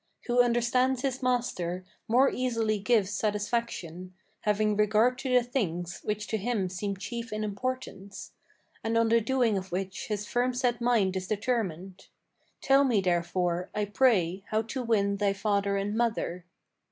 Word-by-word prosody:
Who 245 0 +4
understands 245 +2 +2
his 265 -1 -1
master, 210 -8 -1 0.2
more 255 +4 +4
easily 230 -4 0
gives 210 -2 +2
satisfaction, 205 -4 -2 0.2
Having 210 0 +1
regard 215 +4 +3
to 265 - -3
the 250 -1 +5
things 175 -9 -3
which 210 0 -2
to 220 - 0
him 210 -3 -1
seem 195 +2 -3
chief 230 +3 -6
in 215 0 -2
importance, 205 -3 -5 0.5
And 225 +1 0
on 230 0 +3
the 230 0 +4
doing 235 -3 +1
of 190 0 -11
which 190 +1 -4
his 210 -1 -3
firm 245 +3 0
set 245 -1 0
mind 225 -6 +2
is 185 -1 -3
determined. 195 -5 -2 0.5
Tell 275 0 +5
me 245 -6 +3
therefore, 175 0 0
I 210 0 0
pray, 200 -5 +2
how 215 +1 0
to 255 +4 -4
win 200 -4 +1
thy 200 -1 +1
father 200 0 0
and 200 +2 -2
mother." 220 -7 -1
215 Hz, 155 wpm, -28 LUFS, 195-240 Hz, 0.5 s, the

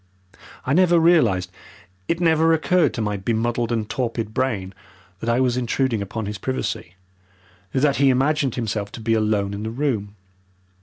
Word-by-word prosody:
I 130 - +1
never 175 +1 +4
realized 120 - +3 0.6
it 170 - 0
never 165 -1 +3
occurred 160 -2 +2
to 115 - -2
my 105 -1 -1
bemuddled 115 +3 -1
and 110 -2 -1
torpid 115 -3 -3
brain 105 -8 -1 0.5
that 115 - -3
I 120 +2 +2
was 125 -1 +1
intruding 125 -2 0
upon 105 +2 -4
his 105 -1 -5
privacy, 110 -7 -3 0.8
that 140 +1 +2
he 140 0 +4
imagined 135 0 +1
himself 105 -3 -3
to - - -7
be 115 0 0
alone 105 -2 +1
in 100 - -5
the 110 - -3
room. 115 -5 -2
120 Hz, 160 wpm, -22 LUFS, 105-140 Hz, 0.8 s, never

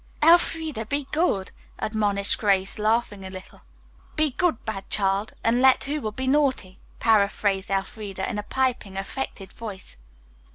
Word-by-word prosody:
"Elfreda, 320 -6 +3
be 285 +3 -1
good," 300 - +1 0.3
admonished 205 -2 0
Grace, 195 -1 +1
laughing 215 -2 0
a 190 - -6
little. 185 0 -11 0.5
"Be 310 -2 +2
good, 340 -2 0
bad 195 -3 -5
child, 195 +1 0
and 235 +2 +3
let 265 0 +5
who 295 +2 -2
will 215 - -3
be 260 +5 -4
naughty," 260 -9 +1 0.2
paraphrased 200 -3 +2
Elfreda 195 0 -3
in 215 -4 -3
a 210 - -8
piping, 250 -7 -1
affected 195 -1 -5
voice. 205 - -8
215 Hz, 140 wpm, -25 LUFS, 195-265 Hz, 0.5 s, let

